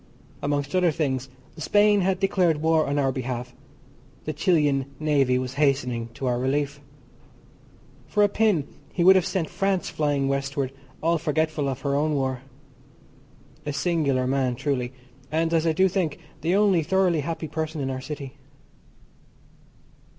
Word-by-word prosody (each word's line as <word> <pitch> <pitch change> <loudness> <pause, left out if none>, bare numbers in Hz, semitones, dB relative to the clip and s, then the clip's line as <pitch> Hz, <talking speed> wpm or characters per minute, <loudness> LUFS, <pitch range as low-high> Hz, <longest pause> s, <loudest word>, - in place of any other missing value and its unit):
Amongst 145 +2 -1
other 180 -1 +4
things 135 -4 -1 0.3
Spain 205 +5 +3
had 190 0 +1
declared 180 -5 +2
war 160 -1 +3
on 140 +1 -1
our 135 -2 +2
behalf, 125 -1 -4 0.7
the 155 - -2
Chilian 150 -5 +2
Navy 140 -5 +2
was 130 0 -3
hastening 125 -5 +1
to 135 - -5
our 120 -1 +1
relief. 140 +2 -1 1.3
For 210 - +2
a - - +6
pin 205 -8 +1 0.2
he 175 - 0
would 190 +2 +8
have 185 -1 +3
sent 180 -5 -1
France 195 0 -1
flying 145 -3 0
westward 140 -1 -1 0.3
all 165 0 +2
forgetful 155 -2 0
of 135 0 -4
her 140 0 -1
own 150 +2 +1
war. 130 -2 -1 1.2
A 150 - -3
singular 145 -5 +1
man 130 -1 0
truly, 130 -2 -2 0.4
and 165 +1 +1
as 165 0 +2
I - - +4
do 185 +4 +3
think 180 -5 -1 0.2
the 170 +4 +1
only 200 -4 +4
thoroughly 180 0 +2
happy 160 +2 -3
person 155 0 -4
in 135 -1 -2
our 130 0 -4
city. 140 -1 -7
150 Hz, 150 wpm, -25 LUFS, 135-170 Hz, 1.3 s, would